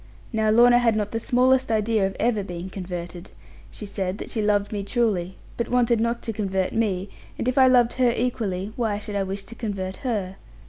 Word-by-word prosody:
Now 220 -1 +2
Lorna 240 +2 +6
had 230 -2 +2
not 210 -1 -1
the 225 - -2
smallest 255 +1 +2
idea 215 -2 +2
of 195 - -7
ever 220 -4 +1
being 180 0 -7
converted. 175 -1 -6 0.4
She 210 - -9
said 195 -1 -3
that - - -7
she 220 - -1
loved 205 -1 +1
me 205 -2 -2
truly, 200 -5 0 0.2
but 235 - -2
wanted 240 -2 +3
not 235 +1 -1
to 225 - -3
convert 190 -3 -1
me; 200 -4 0 0.3
and - - -3
if 255 - +1
I 265 -1 +6
loved 245 -2 +4
her 250 -1 +5
equally, 215 -5 -2
why 220 -4 -1
should 210 0 -6
I 200 - +1
wish 195 +1 -4
to 230 - -10
convert 195 -5 -4
her? 205 -8 -3
215 Hz, 210 wpm, -24 LUFS, 195-235 Hz, 0.4 s, Lorna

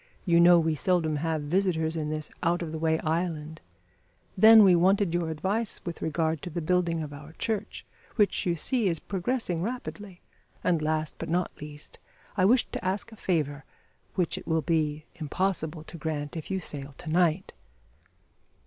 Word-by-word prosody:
You 170 -3 +4
know 175 0 +8
we 160 -1 +1
seldom 160 -1 +1
have 160 0 -1
visitors 160 -1 +1
to 160 -2 -2
this 155 0 -4
out 175 +1 +1
of 160 - -5
the 160 - -4
way 160 0 +2
island. 160 -1 -2 0.7
Then 220 +2 +9
we 190 -2 +7
wanted 190 +1 +3
your 175 -2 0
advice 200 +8 -2
with 170 -2 -5
regard 160 -1 0
to - - -6
the 170 +1 -3
building 170 -1 +1
of 150 -1 -7
our 145 +2 -11
church, 215 +3 -3 0.3
which, 210 -3 +2
you 175 -2 +1
see, 230 - +1
is 170 -3 0
progressing 190 -1 -2
rapidly; 210 -4 -5 0.4
and 170 -3 +2
last, 155 0 -1
but - - -5
not 175 +1 0
least, 150 0 -9 0.4
I 185 -2 +3
wished 240 +5 +3
to - - -4
ask 190 +4 -2
a - - -11
favour, 150 -8 -1 0.5
which 180 -3 0
it - - -14
will 160 -1 +1
be 155 -2 0
impossible 160 0 -1
to 170 - -10
grant 150 -2 -3
if 160 - -6
you 190 -1 -1
sail 140 -4 -7
to - - -11
night." 175 +2 +1
165 Hz, 175 wpm, -28 LUFS, 155-185 Hz, 0.7 s, Then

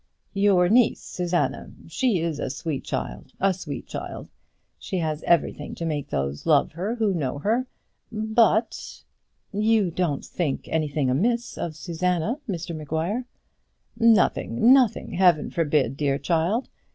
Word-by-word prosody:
"Your 195 -3 +4
niece, 235 +4 +3
Susanna! 175 -1 -2 0.2
She 215 0 +1
is 165 -3 -2
a - - -2
sweet 140 +1 -4
child, - - -5
a 195 0 +3
sweet 150 -7 -7
girl; - - -6 0.5
she 190 - -4
has 155 -3 -2
everything 165 -3 +1
to 170 - -4
make 150 -3 -3
those 70 +1 -3
love 150 -3 +4
her 190 +8 -3
who 220 -4 +1
know 145 -5 -2
her; 225 - 0 0.4
but 220 +1 +1 0.2
" - - -46 0.2
"You 210 -6 +3
don't 165 -5 -1
think 155 -7 -3
anything 150 -4 0
amiss 235 - 0
of 160 -2 -4
Susanna, 180 - -1
Mr 175 -2 -4
Maguire?" 160 - -2 0.7
"Nothing, 225 - +4
nothing; 255 -5 +2
Heaven 175 -4 +3
forbid, 145 -6 +1
dear 140 -2 +1
child! 175 - 0
175 Hz, 140 wpm, -25 LUFS, 150-215 Hz, 0.7 s, Your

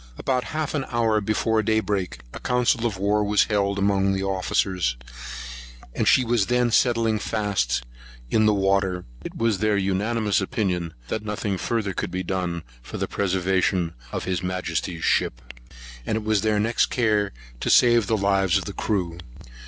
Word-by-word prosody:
About 130 -1 -1
half 155 -1 -3
an 145 -3 0
hour 115 -3 +2
before 110 +2 +1
day 110 +1 +2
break, 100 -4 -2
a - - -7
council 125 -1 +1
of 100 -5 -4
war 105 +2 +1
was 105 0 +3
held 100 -2 0
amongst 100 -1 +2
the 95 - -2
officers; 95 -6 0 1.0
and - - -1
as - - +7
she 130 - +5
was 115 -4 +1
then 125 -1 +2
settling 115 -3 +2
fast 100 - -1 0.5
down 110 - +3
in - - +4
the 105 - +4
water, 95 -2 +1 0.2
it - - -7
was 115 -4 +1
their 105 0 +2
unanimous 100 +2 0
opinion, 90 -4 -2
that 110 - -2
nothing 105 -1 -2
further 100 +1 -2
could 100 - -3
be 95 +1 -3
done 90 -2 -2 0.2
for - - -8
the - - -2
preservation 95 -2 0 0.2
of - - -3
his 90 -1 -1
Majesty's 90 -2 -3
ship; - - +1 0.6
and 110 - -1
it 110 - -2
was 110 -2 +1
their 110 0 +1
next 115 +3 +2
care 105 -4 +1 0.3
to - - -2
save 120 -3 +5
the 110 - +2
lives 95 -2 +2
of 95 - -3
the 100 - -5
crew. 90 -6 -2
100 Hz, 175 wpm, -24 LUFS, 95-110 Hz, 1.0 s, as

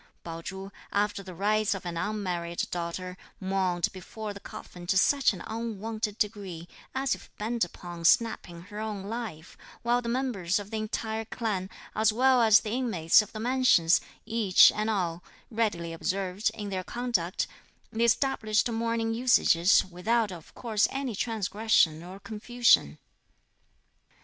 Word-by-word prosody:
Pao 165 -1 -6
Chu, 190 +3 -7 0.2
after 205 0 0
the 185 -2 -10
rites 210 +2 +1
of 190 -1 -8
an 175 -1 -4
unmarried 175 -3 -2
daughter, 180 +1 -4 0.2
mourned 185 -3 0
before 210 +3 -7
the 200 - -9
coffin 175 -2 -10
to 190 - +2
such 275 +7 +4
an 190 - -8
unwonted 220 -1 -4
degree, 195 -6 -3 0.3
as 265 0 +1
if - - -9
bent 225 +2 -1
upon 175 -1 -7
snapping 175 -3 +2
her 205 +3 -9
own 215 -3 -4
life; 205 -7 -6 0.3
while 240 +1 +2
the 235 - -4
members 235 -8 0
of 205 +1 -6
the 220 - -2
entire 220 +1 -3
clan, 210 -5 -3 0.3
as 220 0 +3
well 255 +2 +4
as 220 -2 +6
the 215 - -5
inmates 220 -9 +3
of 210 - -9
the 215 - -7
Mansions, 240 -8 +4 0.2
each 225 -5 +6
and 215 +1 -2
all, 175 -5 -1 0.3
readily 205 -7 -1
observed, 190 +4 -1
in 210 -2 -5
their 185 -1 -2
conduct, 210 -6 -1 0.5
the 225 +1 +1
established 225 -3 +2
mourning 230 0 -1
usages, 215 -7 +4
without 205 +4 0
of 170 -4 -10
course 220 -3 +1
any 270 -4 -3
transgression 210 -7 +1
or 185 +3 -10
confusion. 215 - +2
210 Hz, 150 wpm, -28 LUFS, 180-225 Hz, 0.5 s, as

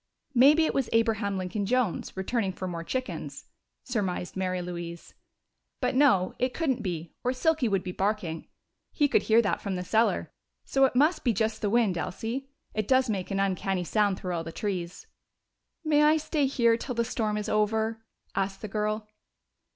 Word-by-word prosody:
"Maybe 290 +6 +6
it - - 0
was 270 -4 0
Abraham 225 -3 +1
Lincoln 185 +2 -2
Jones, 245 -6 0
returning 195 0 -1
for 185 - -5
more 170 -2 -4
chickens," 255 +8 -4 0.4
surmised 195 -7 -2
Mary 185 -1 -1
Louise. 170 -1 -6 0.7
"But - - 0
no, 255 -9 +4
it 255 0 0
couldn't 285 -7 0
be, 170 -4 -4
or 250 - +1
Silky 300 0 +1
would 195 -3 0
be 185 - -4
barking 190 -4 -2 0.4
he 295 - +2
could - - +3
hear 225 +1 +4
that 200 - 0
from 200 -2 -3
the 180 - -3
cellar 225 +5 +1 0.3
so 270 0 +4
it 260 - -1
must 300 +7 +3
be 240 - +2
just 220 +1 -1
the 205 - +1
wind, 210 -6 +2
Elsie. 235 +10 -4 0.2
It 215 -1 -2
does 260 -3 +3
make 190 -3 -3
an 195 -1 -1
uncanny 195 -1 0
sound 200 +2 +1
through 180 -2 -4
all 165 -1 -2
those 165 0 -8
trees." 180 -4 -4 0.8
"May 300 -2 +3
I 305 +1 +5
stay 300 -2 0
here 235 -4 +3
till 250 +1 -5
the 235 0 +1
storm 215 -2 -1
is 210 0 -3
over?" 220 +1 0 0.3
asked 195 +1 -2
the - - -3
girl. 215 +1 -2
215 Hz, 180 wpm, -28 LUFS, 190-250 Hz, 0.8 s, Maybe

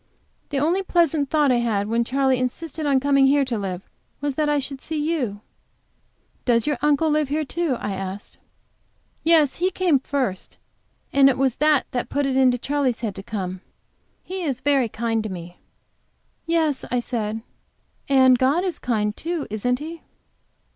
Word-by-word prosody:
"The 285 - -2
only 330 +7 +2
pleasant 325 -6 +1
thought 295 -3 +3
I 245 - +3
had 220 -4 0
when 230 +2 +1
Charley 265 +1 +1
insisted 300 +4 -3
on 275 -2 +3
coming 275 0 +4
here 280 0 +3
to 250 -2 -2
live 190 -2 -5 0.3
was, 285 0 -2
that 300 +2 0
I 295 - +2
should 275 -1 -4
see 315 - -4
you." 295 -10 -1 1.0
"Does 235 -3 +2
your 295 -4 -1
uncle 300 +2 +2
live 300 -2 +1
here, 305 +2 -1
too?" 315 -3 -1
I 205 - -3
asked. 195 +1 -6 0.8
"Yes, 315 -4 +4
he 365 +2 +1
came 360 -6 +2
first, 255 -9 -3 0.6
and 275 -1 +6
it 260 - 0
was 265 -2 +1
that 300 -2 +3
that 245 - -3
put 285 0 0
it 270 -1 0
into 255 -2 +4
Charley's 270 -2 -1
head 220 -4 -2
to 195 - -8
come. 190 -3 -5 0.6
He 375 +1 -5
is 270 -7 -2
very 275 -5 +2
kind 225 0 -1
to 215 - -5
me." 175 -1 -8 0.9
"Yes," 320 -4 +1
I 245 - +1
said, 225 -2 -3 0.7
"and 260 -2 +5
God 280 +7 +2
is 370 -3 -2
kind, 210 -4 -1
too, 335 -2 -3
isn't 245 +4 0
He?" 320 +4 -8
270 Hz, 175 wpm, -23 LUFS, 235-300 Hz, 1.0 s, and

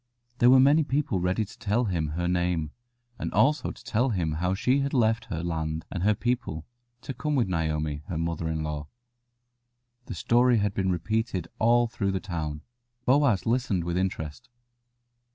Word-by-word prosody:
There 120 - +6
were 130 +1 +7
many 145 +4 +5
people 140 -8 0
ready 90 +5 0
to 100 - -15
tell 115 +2 +1
him 85 -6 -1
her 85 0 0
name, 90 -3 0 0.5
and - - -3
also 150 +2 +3
to - - -10
tell 125 +4 +1
him 90 -8 -1
how 90 +4 0
she 125 +7 +2
had 140 0 -1
left 115 -1 +2
her 85 -5 -4
land 80 -2 -3
and 90 - -3
her 105 +3 +3
people 120 -10 -2 0.4
to 135 - -5
come 150 +2 -2
with 120 -6 +2
Naomi, 80 -4 -1
her 85 - -3
mother 85 0 -2
in 80 -1 -2
law. 75 -1 -4 1.2
The - - -5
story 120 0 +3
had 100 -1 0
been 95 -1 0
repeated 95 +1 -1
all 120 +2 +4
through 110 -4 -2
the 95 - 0
town. 80 -6 -4 0.4
Boaz 130 -7 +3
listened 115 -7 0
with 85 0 -2
interest. 90 +2 -3
95 Hz, 175 wpm, -27 LUFS, 80-120 Hz, 1.2 s, were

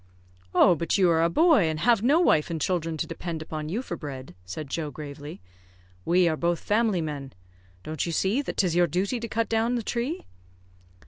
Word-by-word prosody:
"Oh, 180 - +6
but 170 +3 0
you 185 -3 +4
are 165 0 +3
a 165 - +3
boy, 310 - +4
and 155 -1 -2
have 235 -1 +4
no 280 +8 +4
wife 160 - +3
and 165 -1 -3
children 165 0 -1
to - - -1
depend 165 -1 -5
upon 155 -1 -5
you 220 +9 -2
for 175 - -5
bread," 135 - -8
said 120 +12 -6
Joe, 155 +2 -3
gravely. 145 - -9 0.6
"We 180 +1 +4
are 160 - +1
both 170 +1 0
family 210 -4 +1
men. 145 -4 -5 0.5
Don't 155 -1 -3
you 170 - -2
see 195 - +1
that 285 - -6
'tis 180 -4 +1
your 175 0 +4
duty 195 - -1
to 230 - -5
cut 230 +1 -1
down 225 +2 +1
the 235 - -2
tree?" 250 - -3
170 Hz, 205 wpm, -26 LUFS, 155-225 Hz, 0.6 s, Oh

